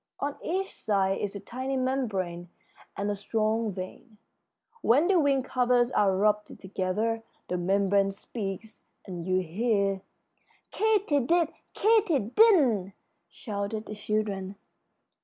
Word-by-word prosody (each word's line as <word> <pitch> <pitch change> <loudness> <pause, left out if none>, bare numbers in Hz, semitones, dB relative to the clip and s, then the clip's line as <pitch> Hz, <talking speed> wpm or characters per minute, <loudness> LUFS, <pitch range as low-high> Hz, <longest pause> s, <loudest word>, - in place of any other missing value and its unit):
On 285 0 -2
each 380 +3 -2
side 195 -2 0
is 205 0 -3
a - - -4
tiny 260 +6 -4
membrane 200 -10 -2 0.5
and 205 +1 -1
a - - -1
strong 215 +2 0
vein. 195 +4 -8 0.6
When 280 +9 +4
the 380 -2 +4
wing 275 -3 +2
covers 250 -1 +2
are 195 -5 +3
rubbed 210 +1 +1
together 200 +4 -1 0.3
the 180 - 0
membrane 195 +2 +2
speaks, 200 +1 -6 0.2
and 180 -3 -6
you 185 0 +2
hear 200 +2 0 0.4
" - - -37
"Katy 415 -9 +2
did, 330 +5 +2 0.3
Katy 430 -7 +4
didn't!" 250 - +4 0.4
shouted 210 0 -4
the - - -7
children. 205 -2 -2
215 Hz, 125 wpm, -28 LUFS, 195-260 Hz, 0.6 s, When